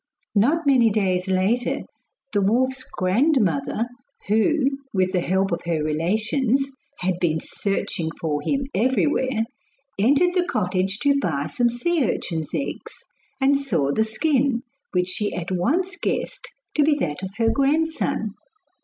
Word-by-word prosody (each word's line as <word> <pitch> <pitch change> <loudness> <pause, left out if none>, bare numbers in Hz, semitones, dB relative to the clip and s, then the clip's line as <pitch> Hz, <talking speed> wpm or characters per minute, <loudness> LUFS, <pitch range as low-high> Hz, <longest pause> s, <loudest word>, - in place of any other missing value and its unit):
Not 290 +11 +2
many 255 -5 +5
days 190 -3 0
later 190 +6 +1 0.5
the 205 - +2
wolf's 260 +6 +1
grandmother, 210 - +1 0.4
who, 260 +8 +3 0.3
with 185 -1 +2
the 180 - +1
help 190 +2 +1
of 170 - -1
her 160 -3 0
relations, 220 - +1 0.3
had 180 -1 0
been 160 -3 +1
searching 175 -3 -2
for 150 -3 -1
him 275 - -1
everywhere, 255 +1 +1 0.6
entered 285 - +4
the 360 -1 +1
cottage 190 -2 0
to 280 -1 +4
buy 145 - -1
some 240 +11 +1
sea 305 +7 0
urchins' 160 -3 -3
eggs, 280 - -5 0.3
and 275 +1 +3
saw 170 - 0
the 220 - +2
skin, 255 +2 +1 0.3
which 180 -1 +1
she 205 +2 -1
at 180 0 -4
once 315 - 0
guessed - - -3 0.2
to 305 - +2
be 295 0 +4
that 150 - -2
of 190 - -4
her 225 -1 +3
grandson. 280 -4 0
220 Hz, 140 wpm, -23 LUFS, 185-275 Hz, 0.6 s, many